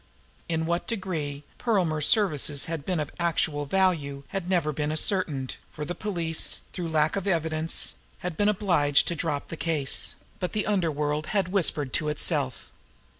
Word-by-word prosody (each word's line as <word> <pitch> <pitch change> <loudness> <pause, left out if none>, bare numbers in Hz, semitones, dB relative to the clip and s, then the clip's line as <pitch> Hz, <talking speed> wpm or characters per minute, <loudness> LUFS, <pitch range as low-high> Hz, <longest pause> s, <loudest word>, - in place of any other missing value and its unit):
In 160 -1 0
what 170 +1 -1
degree 160 -10 -3 0.2
Perlmer's 175 -10 +1
services 150 - +3
had 160 -3 -5
been 180 -3 0
of 150 - -3
actual 155 -4 +1
value 150 -6 +1
had 190 -2 -4
never 170 -5 +2
been 150 +1 -1
ascertained, 155 -5 +1
for 150 - -6
the 175 - -3
police, 170 -6 0
through 175 -2 -3
lack 155 -1 +2
of 200 0 -2
evidence, 160 -2 +1 0.3
had 180 -3 -2
been 205 +5 +3
obliged 175 -9 +3
to 170 - -1
drop 150 -3 -2
the 165 - -5
case; 155 -6 +1 0.2
but 180 - -2
the 210 - 0
underworld 155 -6 0
had 190 -2 +1
whispered 155 -8 +2
to 150 - +1
itself. 145 -3 0
160 Hz, 160 wpm, -27 LUFS, 150-185 Hz, 0.3 s, services